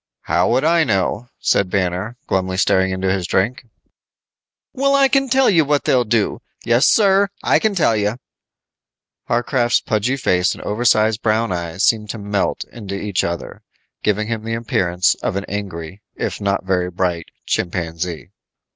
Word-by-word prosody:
"How - - +1
would 135 - +2
I 165 0 +4
know," 110 0 -1
said 100 -2 +1
Banner, 95 +5 -2
glumly 95 - -1
staring 95 -1 +2
into 95 0 -1
his 95 -3 -2
drink. 120 +7 -1 1.1
"Well, 275 +1 +2
I 275 -1 +5
can 270 0 +1
tell 265 +1 +4
you 170 -6 +4
what 145 0 +1
they'll 125 -2 +2
do. 110 -1 0 0.2
Yes, 120 +4 +4
sir, 200 -2 +4 0.2
I - - +3
can 215 -2 0
tell 150 -10 +3
you." 105 +2 -1 1.1
Warcraft's 120 0 +1
pudgy 115 +5 0
face 90 -7 +1
and - - -10
oversize 110 0 +2
brown 110 -1 0
eyes 85 +1 -3
seemed 105 -2 +2
to 110 - -4
melt 100 -1 -2
into 100 -4 -7
each 100 -1 -1
other, 85 0 -5 0.4
giving 105 0 0
him 115 -1 -3
the 115 0 -3
appearance 90 -6 +1
of - - -2
an 100 0 -3
angry, 95 -2 -6
if - - -4
not 100 -1 -1
very 90 -1 0
bright, 90 -2 -2 0.2
chimpanzee. 85 -1 -3
105 Hz, 160 wpm, -19 LUFS, 95-120 Hz, 1.1 s, I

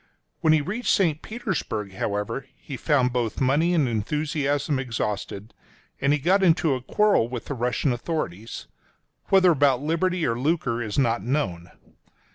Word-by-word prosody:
When 160 - +3
he 155 -1 +4
reached 210 +11 -3
St. 160 -6 +2
Petersburg, 185 - -4
however, 105 +7 -3
he 140 - -8
found 130 0 +1
both 120 -3 -1
money 145 +6 +2
and 150 -6 +3
enthusiasm 145 +4 -1
exhausted, 105 -3 -4 0.5
and 140 +1 +2
he 150 - +3
got 180 +8 +2
into 165 -4 +3
a 130 - -3
quarrel 205 - +2
with 120 -3 -5
the - - -4
Russian 125 +2 0
authorities 115 - -4 0.3
— - - -48
whether 190 -2 +6
about 140 -3 +3
liberty 170 +2 0
or 115 0 -1
lucre 130 -5 0
is 105 -3 -4
not 120 -6 +2
known. 95 - -2
135 Hz, 155 wpm, -25 LUFS, 115-160 Hz, 0.5 s, whether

